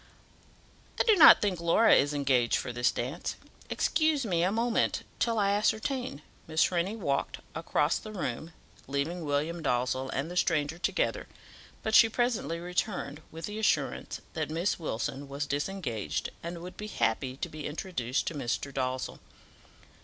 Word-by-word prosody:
"I - - +5
do 445 -3 +5
not 325 - +9
think 190 -4 0
Laura 170 +7 +5
is 145 +1 +4
engaged 135 -5 +2
for 120 - -2
this 120 +1 +2
dance. 130 +8 -4 0.3
Excuse 310 -4 +1
me 175 -5 +1
a 180 +2 +2
moment 230 +2 +1 0.2
till 230 -1 +1
I 200 -1 +3
ascertain." 215 - 0 0.2
Miss 160 +2 +2
Rennie 180 +4 0
walked 140 -11 -1 0.2
across 160 -1 +1
the 215 - -9
room, 165 - -4 0.4
leaving 145 +6 -2
William 155 +3 -1
Dalzell 130 -1 0
and 140 +6 -2
the - - -6
stranger 160 -2 +1
together, - - 0 0.6
but 220 - -2
she 225 0 +8
presently 240 -7 0
returned, 175 -4 -3
with 165 +1 -7
the 210 +1 -5
assurance 220 - 0
that 155 -3 -2
Miss 170 +5 0
Wilson 140 -1 -3
was 140 +1 -3
disengaged, 140 - -2
and 170 0 -6
would 180 +1 -9
be 210 - -5
happy 125 - -1
to 175 - -3
be 155 -2 -6
introduced 145 -5 -2
to - - -2
Mr. 140 0 -3
Dalzell. 130 -1 -2
165 Hz, 155 wpm, -29 LUFS, 140-200 Hz, 0.6 s, not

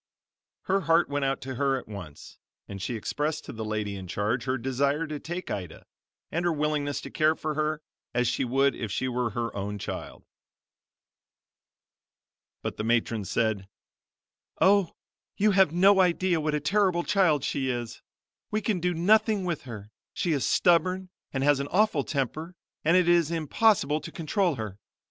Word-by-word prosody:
Her 195 +1 +1
heart 165 -1 +3
went 145 -1 -1
out 135 +1 -1
to 130 -1 -5
her 135 +1 +1
at - - -8
once 100 -9 -10 0.3
and 100 -1 -7
she 120 - -3
expressed 150 +7 -2
to - - -7
the 110 -1 -5
lady 105 -2 -2
in 95 -1 -7
charge 110 +7 -1
her 130 0 0
desire 140 +5 0
to 150 -2 -5
take 175 +4 -5
Ida, 90 -5 -6 0.5
and 170 - -1
her 175 - +2
willingness 150 -2 -1
to - - -9
care 155 +1 +3
for 155 -1 -3
her 155 0 -1 0.3
as 125 0 +1
she 120 +2 0
would 135 +2 +2
if 110 -4 -5
she 130 - -1
were 125 -1 -1
her 115 +2 -3
own 100 +1 -3
child. 100 - -6 2.4
But - - -4
the - - -3
matron 115 -2 0
said 105 -2 -1 0.9
"Oh, 200 -2 +4 0.4
you 210 +1 +4
have 190 -5 +4
no 190 +3 +5
idea 180 -1 +2
what 155 0 0
a - - +1
terrible 185 +2 +2
child 170 -9 +2
she 135 -2 -1
is! 120 -2 -4 0.5
We 215 - 0
can 210 -3 -1
do 175 0 0
nothing 210 +3 +3
with 170 -5 -3
her, 105 -4 -9 0.2
she 175 - 0
is 145 -4 +1
stubborn 185 +2 +2 0.2
and 135 -1 -1
has 145 -1 +4
an 140 - -2
awful 185 -5 +2
temper 155 +6 -3 0.3
and 165 +4 +4
it 180 -2 +3
is 170 -3 +4
impossible 160 -1 +2
to - - -8
control 175 0 0
her. 105 -4 -6
150 Hz, 175 wpm, -27 LUFS, 120-175 Hz, 2.4 s, no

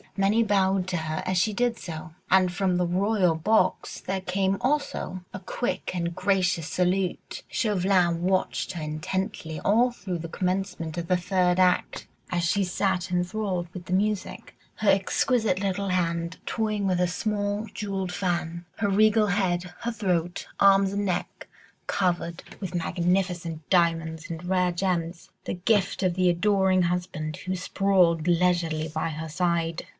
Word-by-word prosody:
Many 200 +4 +3
bowed 195 -3 +2
to 180 - -1
her 155 -1 -3
as 185 0 0
she 210 +4 +2
did 240 +1 0
so, 160 -2 -7 0.2
and 185 -1 +4
from 185 0 0
the 180 0 +1
royal 185 0 +2
box 185 +4 +1
there 190 0 -2
came 190 +1 0
also 260 -9 -1
a 190 - -5
quick 220 +5 -3
and 170 -1 -1
gracious 185 -3 +1
salute. 180 0 -1
Chauvelin 185 -5 +1
watched 185 0 0
her 170 - -5
intently 160 +1 -3
all 235 +5 +3
through 185 -6 -5
the 165 0 -6
commencement 180 -2 -2
of 170 -1 -3
the 180 - +3
third 180 0 +1
act, 180 -1 +2 0.2
as 175 -1 0
she 195 +4 +2
sat 185 0 0
enthralled 180 0 -1
with 180 -2 -8
the 180 - -3
music, 205 +1 -1 0.2
her 215 - +1
exquisite 200 +1 +2
little 200 0 -1
hand 170 -1 -1
toying 215 -3 -1
with 180 -2 +1
a 180 - +3
small 205 +2 -1
jewelled 195 -3 -3
fan, 175 -2 -2
her 205 -2 0
regal 215 +2 +4
head, 180 -3 0
her 235 0 -1
throat, 180 -5 -1
arms 195 -1 +5
and 205 0 -1
neck 180 -3 -3 0.4
covered 175 -1 -1 0.2
with 185 -3 -5
magnificent 175 -2 -1
diamonds 165 -2 +1
and 165 0 -6
rare 180 -1 +2
gems, 170 -2 -2 0.2
the - - -2
gift 195 +1 +1
of 180 -2 +1
the 185 -1 +3
adoring 190 +1 +3
husband 170 -3 -2
who 185 0 -3
sprawled 180 -3 +2
leisurely 170 -3 +2
by 155 +1 -2
her 160 +1 -5
side. 170 0 -1
185 Hz, 155 wpm, -26 LUFS, 170-195 Hz, 0.4 s, arms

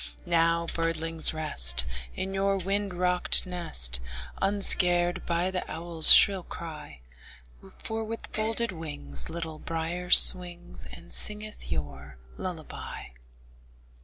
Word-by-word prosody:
Now, 170 -1 -1
birdlings, 165 -1 +2
rest, 65 - -1 0.3
In 190 +1 -7
your 195 0 -2
wind 195 0 -5
rocked 180 0 +2
nest, 65 - +1 0.4
Unscared 180 -3 +2
by 175 +2 -3
the 185 -1 -5
owl's 165 0 +6
shrill 195 -2 +5
cry; 150 - -12 0.8
For 225 0 -7
with 225 +1 -9
folded 225 +1 +1
wings 145 - -5
Little 165 -2 -9
Brier 165 +2 -7
swings, 175 - +4
And - - -13
singeth 215 0 -2
your 70 -3 -8 0.2
lullaby. 170 -4 -10
170 Hz, 105 wpm, -25 LUFS, 155-185 Hz, 0.8 s, owl's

